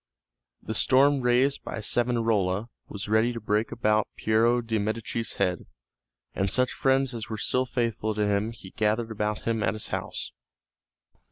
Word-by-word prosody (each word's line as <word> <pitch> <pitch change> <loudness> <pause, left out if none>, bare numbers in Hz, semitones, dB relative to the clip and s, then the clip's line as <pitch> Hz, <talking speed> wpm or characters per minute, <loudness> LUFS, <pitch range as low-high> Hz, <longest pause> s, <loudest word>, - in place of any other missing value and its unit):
The 110 - -4
storm 135 +4 +4
raised 125 +3 +2
by - - -5
Savonarola 115 -3 +1 0.2
was 100 0 -6
ready 110 +3 +3
to 115 - -5
break 105 +1 0
about 110 -2 +1
Piero 115 +2 +3
de' 115 -2 -1
Medici's 110 +2 -3
head, 90 -3 -1 0.7
and 95 0 0
such 125 +6 +2
friends 135 -1 +1
as 115 -2 -6
were 110 - -3
still 130 +4 0
faithful 115 -3 -1
to 105 0 +1
him 105 +2 0
he 100 -5 -12
gathered 110 +1 0
about 105 0 -2
him 115 -1 0
at 105 0 +1
his 110 - -6
house. - - -4
110 Hz, 160 wpm, -27 LUFS, 105-120 Hz, 0.7 s, storm